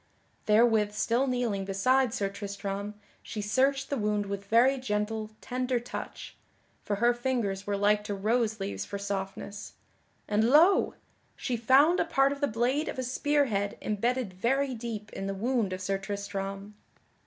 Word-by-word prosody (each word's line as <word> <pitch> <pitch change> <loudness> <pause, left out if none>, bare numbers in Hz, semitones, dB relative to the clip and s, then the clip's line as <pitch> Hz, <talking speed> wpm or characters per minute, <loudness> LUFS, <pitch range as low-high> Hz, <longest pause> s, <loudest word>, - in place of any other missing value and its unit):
Therewith 215 -1 +4
still 235 +5 +1
kneeling 240 -6 -1
beside 250 +6 +2
Sir 200 -3 -1
Tristram 200 0 -5 0.3
she 215 - -7
searched 265 +7 +1
the 280 - 0
wound 210 -1 0
with 200 0 -5
very 245 +6 +4
gentle, 215 -2 -2
tender 250 0 -1
touch 240 - -7 0.5
(for 205 - -2
her 235 +4 +3
fingers 235 -6 -2
were 200 -1 0
like 210 +1 +3
to 205 - -3
rose 220 +2 0
leaves 195 +1 -3
for 200 - -5
softness) 200 0 -5 0.5
and 210 +1 +2
lo! 330 +8 +5 0.4
she 250 - -2
found 270 +9 +4
a - - +2
part 275 -4 +3
of 280 +1 -5
the 285 - +3
blade 245 +6 0
of - - -5
a 260 - -2
spear 290 +3 +1
head 200 -4 -2
embedded 230 0 -1
very 265 +8 0
deep 220 -2 -6
in 195 - -4
the 195 - -3
wound 230 -1 0
of 185 - -3
Sir 195 +1 -1
Tristram. 200 0 -5
215 Hz, 165 wpm, -29 LUFS, 200-255 Hz, 0.5 s, lo